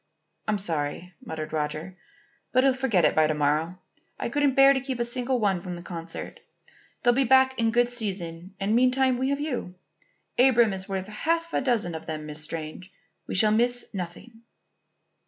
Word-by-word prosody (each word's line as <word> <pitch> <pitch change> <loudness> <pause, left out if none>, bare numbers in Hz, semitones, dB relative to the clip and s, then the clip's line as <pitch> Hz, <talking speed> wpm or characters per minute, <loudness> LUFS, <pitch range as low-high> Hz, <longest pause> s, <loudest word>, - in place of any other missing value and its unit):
"I'm 215 -1 +1
sorry," 170 -1 -2
muttered 155 -1 -6
Roger. 155 +4 -3 0.6
"But 255 0 +3
he'll 270 -1 +4
forget 245 -10 +2
it - - +2
by 155 -1 +4
to 155 - -1
morrow. 150 +4 0 0.4
I - - -2
couldn't 285 0 +1
bear 275 0 +7
to 265 - -1
keep 260 -2 -4
a 235 - +2
single 250 +1 0
one 195 -5 +1
from 180 0 -6
the 175 - -9
concert. 170 -2 -7 0.6
They'll 245 - +5
be 270 +3 +2
back 260 +1 +4
in 230 -1 +3
good 240 +1 +3
season 190 -6 -4
and 205 +3 +1
meantime 255 +1 +3
we 260 +1 0
have 280 0 0
you. 250 -11 -4 0.6
Abram 240 -5 +5
is 190 0 -5
worth 190 -1 -2
half 330 +11 -2
a - - +1
dozen 235 -10 0
of 160 0 -7
them, 155 -1 -4
Miss 150 0 -2
Strange. 160 +3 -6 0.4
We - - -4
shall 210 +2 +4
miss 245 +2 +1
nothing." 195 +5 -7
210 Hz, 185 wpm, -26 LUFS, 170-255 Hz, 0.6 s, bear